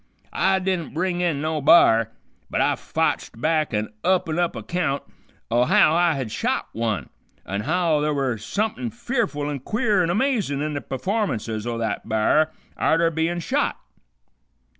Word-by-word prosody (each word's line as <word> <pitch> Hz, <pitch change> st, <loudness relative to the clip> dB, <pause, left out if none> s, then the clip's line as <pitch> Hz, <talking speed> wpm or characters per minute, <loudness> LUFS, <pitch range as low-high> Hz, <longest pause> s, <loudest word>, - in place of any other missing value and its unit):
I 190 Hz, 0 st, +2 dB
didn't 185 Hz, -5 st, -2 dB
bring 180 Hz, +1 st, 0 dB
in 165 Hz, -5 st, 0 dB
no 155 Hz, 0 st, -1 dB
b'ar, 115 Hz, -7 st, +6 dB, 0.4 s
but -, -, -1 dB
I -, -, +3 dB
fotched -, -, -2 dB
back 155 Hz, +2 st, +1 dB
an 105 Hz, -1 st, -2 dB
up 185 Hz, -2 st, +2 dB
an' 160 Hz, +1 st, -1 dB
up 175 Hz, -5 st, 0 dB
account 140 Hz, +5 st, -2 dB, 0.5 s
o' 120 Hz, +1 st, +3 dB
how 155 Hz, +4 st, +5 dB
I 170 Hz, 0 st, +3 dB
had 130 Hz, -5 st, -4 dB
shot -, -, -1 dB
one, 110 Hz, -, -2 dB, 0.4 s
on' 100 Hz, +1 st, -3 dB
how 165 Hz, +3 st, +1 dB
th' 150 Hz, 0 st, +1 dB
were 130 Hz, -5 st, -1 dB
sumpin' 130 Hz, -, -2 dB
fearful 150 Hz, -, -2 dB
an' 145 Hz, -2 st, -3 dB
queer 210 Hz, -, +1 dB
an' 170 Hz, -, +1 dB
amazin' 210 Hz, -, 0 dB
in 150 Hz, +1 st, -2 dB
the 145 Hz, -, -3 dB
p'formances 130 Hz, -, -2 dB
o' 120 Hz, -1 st, -2 dB
that 110 Hz, -3 st, -3 dB
b'ar 130 Hz, +9 st, +2 dB, 0.3 s
arter 165 Hz, +1 st, +2 dB
bein' 165 Hz, +2 st, -1 dB
shot. -, -, -1 dB
155 Hz, 160 wpm, -23 LUFS, 120-175 Hz, 0.5 s, b'ar